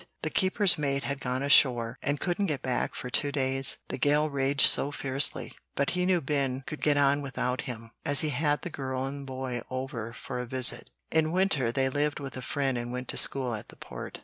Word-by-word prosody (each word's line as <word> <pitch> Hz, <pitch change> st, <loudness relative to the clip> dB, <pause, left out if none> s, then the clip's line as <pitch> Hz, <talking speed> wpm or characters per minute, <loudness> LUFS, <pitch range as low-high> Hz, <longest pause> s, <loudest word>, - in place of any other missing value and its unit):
The 155 Hz, -, -2 dB
keeper's 190 Hz, -2 st, +2 dB
mate 140 Hz, -1 st, -1 dB
had 140 Hz, +3 st, -3 dB
gone 130 Hz, 0 st, -3 dB
ashore 125 Hz, -4 st, +4 dB
and 145 Hz, 0 st, -1 dB
couldn't 180 Hz, +3 st, -1 dB
get 150 Hz, -5 st, -3 dB
back 125 Hz, -1 st, -2 dB
for 125 Hz, -, -6 dB
two 145 Hz, -, +2 dB
days, 135 Hz, -1 st, +3 dB
the -, -, -5 dB
gale 150 Hz, +3 st, +2 dB
raged 140 Hz, +1 st, +4 dB
so 140 Hz, -, +4 dB
fiercely; 135 Hz, 0 st, -1 dB, 0.2 s
but 140 Hz, -, 0 dB
he 180 Hz, 0 st, -1 dB
knew 180 Hz, -2 st, +2 dB
Ben 135 Hz, -2 st, -1 dB
could 150 Hz, -, -7 dB
get 145 Hz, -1 st, +2 dB
on 140 Hz, 0 st, +3 dB
without 130 Hz, -2 st, -3 dB
him, 115 Hz, -1 st, -8 dB
as 145 Hz, -2 st, +5 dB
he 155 Hz, -, -1 dB
had 145 Hz, +1 st, 0 dB
the 175 Hz, -, -5 dB
girl 130 Hz, -2 st, -4 dB
and 140 Hz, 0 st, -7 dB
boy 130 Hz, -2 st, -4 dB
over 130 Hz, -3 st, -5 dB
for 125 Hz, +2 st, -7 dB
a 125 Hz, -, -5 dB
visit. 130 Hz, 0 st, 0 dB, 0.2 s
In 160 Hz, -1 st, +1 dB
winter 170 Hz, -10 st, +1 dB
they 130 Hz, +2 st, 0 dB
lived 145 Hz, +3 st, -1 dB
with 140 Hz, -2 st, -7 dB
a 130 Hz, -, -6 dB
friend 135 Hz, 0 st, -1 dB
and 120 Hz, 0 st, -6 dB
went 125 Hz, +1 st, -6 dB
to -, -, -1 dB
school 130 Hz, -3 st, +3 dB
at 105 Hz, -, -7 dB
the -, -, -14 dB
Port. -, -, -9 dB
135 Hz, 220 wpm, -28 LUFS, 130-145 Hz, 0.2 s, as